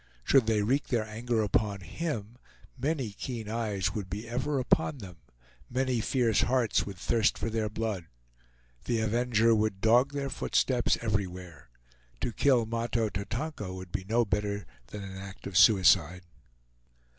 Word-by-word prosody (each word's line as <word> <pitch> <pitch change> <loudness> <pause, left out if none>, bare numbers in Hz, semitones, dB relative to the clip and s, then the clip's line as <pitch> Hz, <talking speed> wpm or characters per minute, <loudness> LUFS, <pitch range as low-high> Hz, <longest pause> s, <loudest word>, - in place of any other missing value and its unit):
Should 130 - +4
they 110 -2 +2
wreak 135 +7 +1
their 115 -3 0
anger 115 +1 -1
upon 100 -1 0
him, 115 - -5 0.4
many 135 -3 -2
keen 115 +1 -6
eyes 105 -4 -1
would 100 -4 -5
be 105 +5 -5
ever 130 +5 -1
upon 145 +3 +1
them, 95 -8 -10 0.5
many 130 -1 0
fierce 115 -3 +2
hearts 120 -4 +1
would 100 -2 -7
thirst 110 +4 +1
for 115 - -3
their 110 -1 -1
blood. 105 -5 -3 0.8
The 120 -2 0
avenger 115 0 +2
would 110 -3 0
dog 120 +6 +4
their 140 -1 -3
footsteps 130 -2 +1
everywhere. 90 - -4 0.5
To 120 - -2
kill 125 -3 +3
Mahto 115 0 -1
Tatonka 110 +1 -4
would 95 -1 -9
be 100 -3 -3
no 115 +4 +1
better 100 -1 -2 0.2
than 105 +6 -7
an 95 -1 -8
act 95 0 -10
of 100 - -6
suicide. 90 -2 +5
110 Hz, 150 wpm, -29 LUFS, 100-120 Hz, 0.8 s, suicide